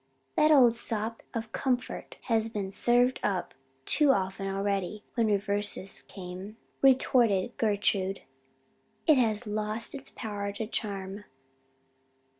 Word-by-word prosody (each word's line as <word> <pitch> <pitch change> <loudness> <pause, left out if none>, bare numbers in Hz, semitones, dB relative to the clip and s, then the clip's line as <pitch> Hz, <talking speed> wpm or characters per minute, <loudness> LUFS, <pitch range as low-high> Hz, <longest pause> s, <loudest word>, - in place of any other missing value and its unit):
"That 305 - +4
old 260 -6 +7
sop 225 -1 -2
of 225 -1 -4
comfort 250 -2 -2
has 225 -2 +1
been 200 -3 -4
served 245 +4 +2
up 190 -4 -1 0.3
too 300 -2 +4
often 195 -4 +1
already 195 +1 -2
when 230 -2 +2
reverses 205 -1 0
came," 190 +3 -9 0.2
retorted 240 -5 +3
Gertrude. 200 -3 0 0.8
"It 305 -4 +6
has 225 -1 +2
lost 215 +2 -2
its 275 -1 -8
power 205 -3 -4
to 220 +2 -4
charm." 200 -2 -3
210 Hz, 115 wpm, -29 LUFS, 200-235 Hz, 0.8 s, old